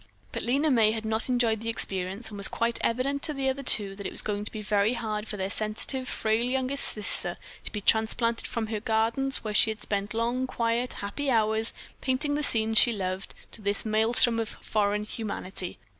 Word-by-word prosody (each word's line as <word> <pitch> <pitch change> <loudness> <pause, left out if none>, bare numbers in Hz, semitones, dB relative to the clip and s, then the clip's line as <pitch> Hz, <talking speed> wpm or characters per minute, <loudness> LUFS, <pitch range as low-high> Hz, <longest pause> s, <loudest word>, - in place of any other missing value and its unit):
But - - -4
Lena 280 +5 +1
May 220 -4 +4
had 220 -1 -4
not 220 +3 -1
enjoyed 235 -3 +1
the 230 - -3
experience, 195 0 -1
and - - -12
it - - -7
was 200 - +6
quite 230 0 +1
evident 265 +4 0
to 305 -1 -1
the 270 -1 0
other 265 +1 -2
two 205 -6 +2
that 200 -1 -5
it - - -6
was - - -5
going 205 -1 -2
to 210 - -3
be 215 -1 -6
very 210 +2 +2
hard 220 -3 -3
for 210 - -6
their 190 0 -3
sensitive, 220 +5 -1
frail 220 +1 0
youngest 260 +2 +1
sister 210 -1 -1 0.2
to - - -1
be 210 - -4
transplanted 230 +2 +1
from 230 -2 -3
her 215 -1 -3
gardens, 230 +5 +1
where 215 -1 -3
she 215 - +5
had 215 -1 -5
spent 200 +1 -3
long, 240 +3 0
quiet, 235 0 -1
happy 270 +8 -4
hours, 220 -1 +2 0.3
painting 270 +3 0
the 295 - 0
scenes 225 -5 +4
she 240 - +5
loved, 190 -1 -4 0.2
to 225 - -9
this 200 +1 -1
maelstrom 225 +2 +4
of 225 -2 -2
foreign 210 -1 -1
humanity. 205 -4 -5
220 Hz, 210 wpm, -27 LUFS, 210-245 Hz, 0.3 s, was